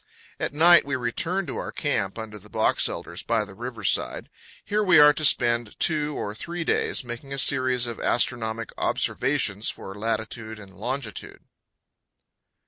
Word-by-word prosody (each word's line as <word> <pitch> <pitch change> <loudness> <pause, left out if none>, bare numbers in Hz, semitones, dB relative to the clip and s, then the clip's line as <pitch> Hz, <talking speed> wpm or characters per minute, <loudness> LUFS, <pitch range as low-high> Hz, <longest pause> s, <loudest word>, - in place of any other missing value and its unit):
At - - -1
night 170 +4 +6
we 140 0 -2
return 165 +10 -1
to 135 - -5
our - - -4
camp - - -2
under 110 -2 -7
the 105 +2 -16
box 110 +1 +2
elders - - -6
by 115 -2 0
the 100 - -13
river 115 +1 -7
side. - - 0 0.4
Here 210 +1 0
we 185 -5 +5
are 150 0 +8
to 155 - -4
spend 120 -5 +2
two 150 -2 0
or 105 - -4
three 170 +9 -5
days, 155 - 0
making 120 +3 -8
a - - -3
series 130 -2 +3
of 120 -1 -5
astronomic 115 -2 -1
observations 125 -6 0
for 95 - -7
latitude 110 +1 -4
and 100 -2 -13
longitude. 120 +1 -5
120 Hz, 160 wpm, -25 LUFS, 110-145 Hz, 0.4 s, are